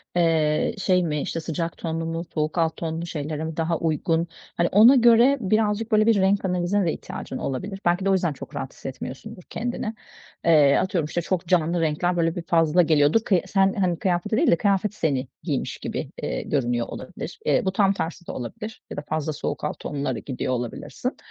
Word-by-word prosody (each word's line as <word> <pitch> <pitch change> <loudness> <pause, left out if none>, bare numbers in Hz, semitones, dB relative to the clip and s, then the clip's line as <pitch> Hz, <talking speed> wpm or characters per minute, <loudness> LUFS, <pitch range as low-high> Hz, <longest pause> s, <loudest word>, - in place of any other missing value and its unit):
eee, 165 +2 +2
şey 185 -2 +2
mi, 150 -3 -1
işte 165 - -3
sıcak 165 +1 -3
tonlu 165 -1 -3
mu? 165 +1 -3
Soğuk 155 +1 -1
alt 165 -1 +1
tonlu 165 0 -3
şeylere 155 0 -4
daha 165 0 0
uygun? 165 +1 0 0.3
Hani 170 - +3
ona 225 +7 +8
göre 240 +3 +6
birazcık 215 +1 +1
böyle 215 0 +4
bir 230 - +5
renk 195 0 +2
analizine 180 +2 +1
de 165 - +1
ihtiyacın - - -7
olabilir. 190 +9 -4
Belki 175 +2 +2
de - - +3
o - - +4
yüzden 175 -5 +1
çok - - -10
rahat 135 0 -5
hissetmiyorsundur 165 - -8
kendini. 230 -2 -3 0.5
Eee, 150 -4 +6
atıyorum, 180 -4 0
işte 160 +3 -2
çok 175 0 -2
canlı 170 -1 +2
renkler 170 +3 0
böyle 165 -1 +1
bir 175 - -4
fazla 165 +1 +3
geliyordur 155 +3 +4
ki 185 -4 +4
sen, 195 -1 +3
hani 180 -4 0
kıyafeti 185 +4 0
değil 325 - +4
de - - +6
kıyafet 200 +2 +1
seni 140 -7 -1 0.2
giymiş - - -2
gibi, - - -4
eee, - - -2
görünüyor 120 -4 -1
olabilir. - - -8
Eee, - - +3
bu 190 - +1
tam 195 0 +3
tersi 175 -1 -5
de - - -4
olabilir 170 - -7
ya - - -7
da - - -2
fazla 155 0 -1
soğuk 145 - -4
alt 150 - -3
tonlara 140 -4 -3
gidiyor 130 -1 -3
olabilirsin. 120 -2 -4
170 Hz, 195 wpm, -24 LUFS, 155-195 Hz, 0.5 s, ona